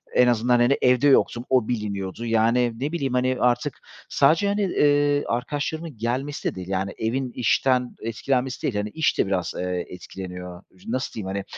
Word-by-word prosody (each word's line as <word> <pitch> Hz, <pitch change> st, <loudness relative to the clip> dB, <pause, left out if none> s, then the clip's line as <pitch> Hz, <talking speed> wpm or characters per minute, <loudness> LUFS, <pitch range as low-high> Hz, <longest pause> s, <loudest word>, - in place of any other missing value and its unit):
En 125 Hz, -, +6 dB
azından, 120 Hz, +1 st, +3 dB
hani, 125 Hz, +4 st, +4 dB
evde 125 Hz, +2 st, +4 dB
yoktum 120 Hz, -3 st, +3 dB
o 125 Hz, -4 st, +3 dB
biliniyordu. 105 Hz, -1 st, -3 dB
Yani, 115 Hz, +1 st, +2 dB
ne 145 Hz, +4 st, -2 dB
bileyim, 140 Hz, -7 st, -2 dB
hani, 125 Hz, 0 st, +1 dB
artık 125 Hz, -1 st, 0 dB, 0.3 s
sadece, 160 Hz, +8 st, +3 dB
hani, 205 Hz, +1 st, 0 dB
eee, 145 Hz, -5 st, +2 dB
arkadaşlarımın 145 Hz, +4 st, -3 dB
gelmesi 130 Hz, +6 st, -2 dB
de -, -, -15 dB
değil, 90 Hz, -1 st, -7 dB
yani, 95 Hz, +1 st, -2 dB
evin 125 Hz, +3 st, -2 dB
işten 125 Hz, +1 st, +1 dB
etkilenmesi 125 Hz, +3 st, -2 dB
değil, 120 Hz, -, -1 dB
hani, 105 Hz, +1 st, -1 dB
iş 160 Hz, +6 st, 0 dB
de -, -, +3 dB
biraz, 95 Hz, -3 st, -1 dB
eee, 90 Hz, -1 st, -2 dB
etkileniyor. 90 Hz, 0 st, -8 dB, 0.2 s
Nasıl 130 Hz, +3 st, -2 dB
diyeyim, 100 Hz, -4 st, -5 dB
hani, 100 Hz, 0 st, -3 dB
120 Hz, 170 wpm, -24 LUFS, 105-135 Hz, 0.3 s, En